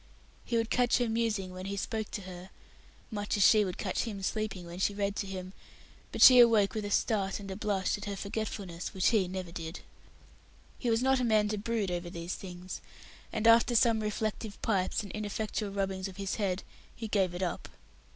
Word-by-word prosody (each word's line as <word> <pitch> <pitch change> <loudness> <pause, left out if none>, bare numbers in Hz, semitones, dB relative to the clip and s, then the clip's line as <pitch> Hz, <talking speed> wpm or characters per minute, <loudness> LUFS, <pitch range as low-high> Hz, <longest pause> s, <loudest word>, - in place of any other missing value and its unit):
He 235 - 0
would 225 0 -1
catch 245 -1 +3
her 245 -1 +1
musing 220 -4 -1
when 185 +1 -7
he 200 0 -3
spoke 220 +1 -3
to 205 - -5
her, 180 0 -9 0.6
much 205 -1 -2
as 200 - +5
she 215 -1 +6
would 185 -3 -4
catch - - -2
him 200 -4 -5
sleeping 215 -3 -2
when 170 +1 -8
she 200 +1 +1
read 200 0 -1
to 200 - -2
him 185 -1 -6 0.6
but - - +3
she 255 -1 +10
awoke 225 -4 +6
with 215 -2 -3
a - - -3
start 200 -1 +1
and 195 -1 -7
a - - -4
blush 200 -1 -1
at - - -7
her 200 -1 -3
forgetfulness, 200 -3 -5
which 185 - +3
he 210 -5 +2
never 185 -1 -5
did. 165 +1 -6 1.0
He 245 - -1
was 225 +2 +2
not 265 0 +3
a - - 0
man 215 -3 +3
to 215 - -1
brood 215 -3 -1
over 175 0 -3
these 170 +1 -5
things; 180 -1 -7 0.5
and, 220 0 -2
after 230 +1 +6
some 230 -1 +4
reflective 215 0 -3
pipes 195 -1 +1
and 200 - -8
ineffectual 210 0 -3
rubbings 195 -1 -2
of 190 -1 -11
his 195 -1 -3
head, 195 -3 -1 0.3
he 225 - -5
"gave 190 -4 +1
it 180 - -2
up". 175 - -3
200 Hz, 210 wpm, -31 LUFS, 185-220 Hz, 1.0 s, she